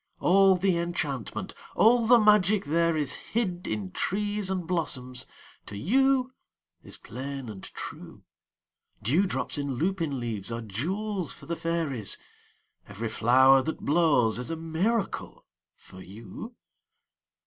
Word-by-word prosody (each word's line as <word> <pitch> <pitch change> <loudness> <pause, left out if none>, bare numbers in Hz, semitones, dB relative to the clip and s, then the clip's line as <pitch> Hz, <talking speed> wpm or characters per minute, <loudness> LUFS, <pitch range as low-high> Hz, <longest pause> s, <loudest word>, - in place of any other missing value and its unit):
All 195 +1 +5
the 185 -1 +1
enchantment, 155 - -3 0.2
all 230 +1 +5
the 245 +1 +8
magic 210 -3 +4
there 165 +2 +2
is 145 -3 -1
Hid 185 -6 -3
in 105 -4 -3
trees 205 - -1
and 185 -2 -2
blossoms, 130 -7 -3 0.4
to 100 - -7
you 260 - +2 0.5
is - - -8
plain 135 +2 -7
and 105 -3 -8
true. - - -9 0.8
Dewdrops 160 - +1
in 140 -2 -2
lupin 165 -3 -1
leaves 115 -3 -4
are 115 0 -3
jewels 180 - -2
for - - -12
the 170 - -3
fairies; 160 -11 -2 0.7
Every 105 +3 -5
flower 130 +4 +5
that 160 +4 -4
blows 145 -8 +3
is 125 - -3
a 165 - -2
miracle 170 +7 -2 0.3
for 95 - -14
you. 110 - -10
160 Hz, 125 wpm, -27 LUFS, 125-195 Hz, 0.8 s, the